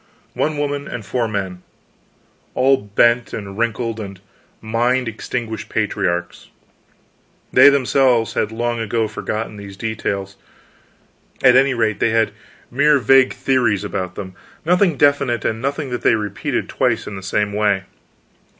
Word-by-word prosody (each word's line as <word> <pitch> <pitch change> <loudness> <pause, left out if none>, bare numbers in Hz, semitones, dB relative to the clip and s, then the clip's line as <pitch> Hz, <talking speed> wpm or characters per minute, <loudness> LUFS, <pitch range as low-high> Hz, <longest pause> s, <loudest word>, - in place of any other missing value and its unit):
One 155 0 -1
woman 145 0 -2
and 115 -4 -6
four 120 +1 -1
men 95 -4 -4 0.9
all 135 +2 +4
bent, 120 +2 +1
and 100 -2 -6
wrinkled, 115 0 -2
and 100 -3 -7 0.4
mind 120 +3 0
extinguished 115 0 -5
patriarchs. 90 -5 -2 1.1
They - - +8
themselves 130 -4 +2
had 105 - -1
long 120 +1 -2
ago 115 0 -1
forgotten 110 0 -4
these 100 -1 -10
details; 100 -3 -3 1.1
at 125 -2 +7
any 135 0 +4
rate 110 -3 0
they - - +2
had 110 0 +2 0.4
mere 145 +3 +4
vague 130 +1 +4
theories 120 -7 +1
about 95 -3 -4
them, 95 -2 -7 0.3
nothing 180 -2 +3
definite 140 -4 +2
and 110 0 -1
nothing 140 +1 -3
that 125 - -3
they - - +4
repeated 105 -2 -3
twice - - 0
in 105 - -7
the 95 - -7
same 105 +2 -1
way. 100 -2 +1
115 Hz, 140 wpm, -19 LUFS, 105-130 Hz, 1.1 s, They